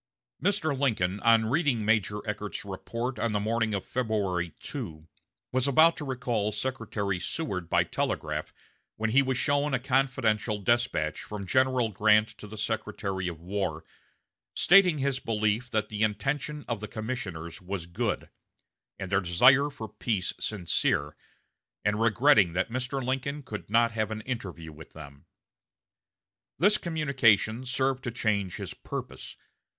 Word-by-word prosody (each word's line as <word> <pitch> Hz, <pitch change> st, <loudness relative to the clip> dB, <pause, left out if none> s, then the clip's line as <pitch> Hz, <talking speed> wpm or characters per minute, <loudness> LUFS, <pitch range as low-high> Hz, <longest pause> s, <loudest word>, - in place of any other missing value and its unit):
Mr. 170 Hz, -8 st, +1 dB
Lincoln, 105 Hz, -8 st, 0 dB
on 115 Hz, 0 st, +4 dB
reading 130 Hz, -3 st, +1 dB
Major 105 Hz, -1 st, +1 dB
Eckert's 105 Hz, 0 st, -4 dB
report 115 Hz, +6 st, -4 dB
on 115 Hz, -2 st, 0 dB
the 105 Hz, -, +1 dB
morning 110 Hz, 0 st, 0 dB
of 100 Hz, -, -4 dB
February 100 Hz, -8 st, -1 dB
2, 80 Hz, 0 st, -7 dB, 0.4 s
was 130 Hz, +1 st, +1 dB
about 160 Hz, +5 st, +6 dB
to -, -, -5 dB
recall 120 Hz, -5 st, -1 dB
Secretary 105 Hz, -4 st, -2 dB
Seward 90 Hz, -, -3 dB
by -, -, +4 dB
telegraph, -, -, -2 dB, 0.4 s
when 110 Hz, 0 st, -1 dB
he 135 Hz, +4 st, +6 dB
was 130 Hz, -2 st, -1 dB
shown 145 Hz, 0 st, +1 dB
a -, -, 0 dB
confidential 125 Hz, -5 st, +1 dB
despatch 120 Hz, -7 st, 0 dB
from 105 Hz, -2 st, -6 dB
General 130 Hz, +1 st, +2 dB
Grant 105 Hz, +1 st, +4 dB
to 105 Hz, -, -9 dB
the 110 Hz, +1 st, -9 dB
Secretary 100 Hz, -3 st, -2 dB
of 85 Hz, -3 st, -5 dB
War, 90 Hz, -3 st, -3 dB, 0.7 s
stating 180 Hz, -3 st, +6 dB
his 135 Hz, -1 st, 0 dB
belief 110 Hz, +2 st, 0 dB
that 110 Hz, -3 st, -1 dB
the 105 Hz, -1 st, -4 dB
intention 135 Hz, +8 st, -1 dB
of 115 Hz, -3 st, -2 dB
the 105 Hz, -, -6 dB
commissioners 100 Hz, -9 st, -5 dB
was 90 Hz, -1 st, -4 dB
good, 85 Hz, 0 st, -2 dB, 0.7 s
and 95 Hz, -1 st, -6 dB
their 95 Hz, 0 st, +3 dB
desire 125 Hz, +11 st, +5 dB
for 115 Hz, -6 st, -7 dB
peace 105 Hz, -7 st, -2 dB
sincere, 80 Hz, -6 st, 0 dB, 0.7 s
and 105 Hz, +1 st, +1 dB
regretting 115 Hz, -, +4 dB
that 95 Hz, +5 st, -1 dB
Mr. 130 Hz, +1 st, -2 dB
Lincoln 135 Hz, +3 st, -2 dB
could 105 Hz, -5 st, -7 dB
not 115 Hz, +2 st, +4 dB
have 110 Hz, -2 st, -1 dB
an 110 Hz, 0 st, -4 dB
interview 95 Hz, -10 st, -5 dB
with 75 Hz, 0 st, -13 dB
them. 70 Hz, -3 st, -12 dB, 1.3 s
This 205 Hz, +4 st, +4 dB
communication 130 Hz, -, +2 dB
served 130 Hz, 0 st, 0 dB
to -, -, 0 dB
change 105 Hz, -5 st, -1 dB
his -, -, -6 dB
purpose. -, -, -7 dB
110 Hz, 145 wpm, -28 LUFS, 100-130 Hz, 1.3 s, about